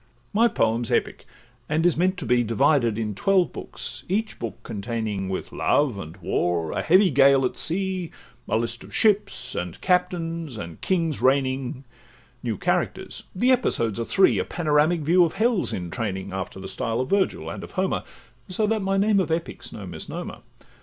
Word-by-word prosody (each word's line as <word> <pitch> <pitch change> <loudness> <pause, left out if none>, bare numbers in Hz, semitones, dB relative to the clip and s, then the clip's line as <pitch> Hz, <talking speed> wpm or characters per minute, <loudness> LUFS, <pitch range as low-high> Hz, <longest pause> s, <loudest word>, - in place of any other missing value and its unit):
My 230 +3 +5
poem 115 - +1
's 115 - -3
epic, - - -1 0.4
and 155 +3 +1
is 175 - +4
meant 185 +3 +1
to 175 - -5
be 120 +1 +3
Divided 120 0 +2
in 110 -2 -2
twelve 185 - +2
books; - - -7
each 215 +4 -1
book 115 -5 -5
containing, 105 -2 -3
With 95 - -4
love, 135 -9 +1
and 80 0 -8
war, 85 -2 -1
a - - -1
heavy 185 +2 +5
gale 135 0 +5
at - - -2
sea, 185 0 -2 0.4
A - - +2
list 115 +1 -3
of - - -9
ships, 200 - +2
and 90 -1 -4
captains, 170 - 0
and 85 -5 -8
kings 165 -6 0
reigning, 130 -1 +1 0.6
New - - -2
characters; - - -2
the 245 +7 +3
episodes 115 - +1
are 115 - -1
three: 190 +9 +4
A - - +1
panoramic 155 +1 +1
view 175 +5 +5
of 165 - 0
hell 220 -1 +2
's - - -2
in 90 -2 -4
training, 95 -6 -3
After 95 0 -5
the 95 - -7
style 115 -2 -2
of 130 - -2
Virgil 200 -1 +1
and - - -7
of - - -10
Homer, - - 0 0.5
So 200 +4 0
that 220 0 0
my 195 0 0
name 205 0 +3
of 185 - 0
Epic 165 +1 -2
's - - -7
no 105 - -8
misnomer. 85 -3 -6
140 Hz, 185 wpm, -24 LUFS, 115-185 Hz, 0.6 s, My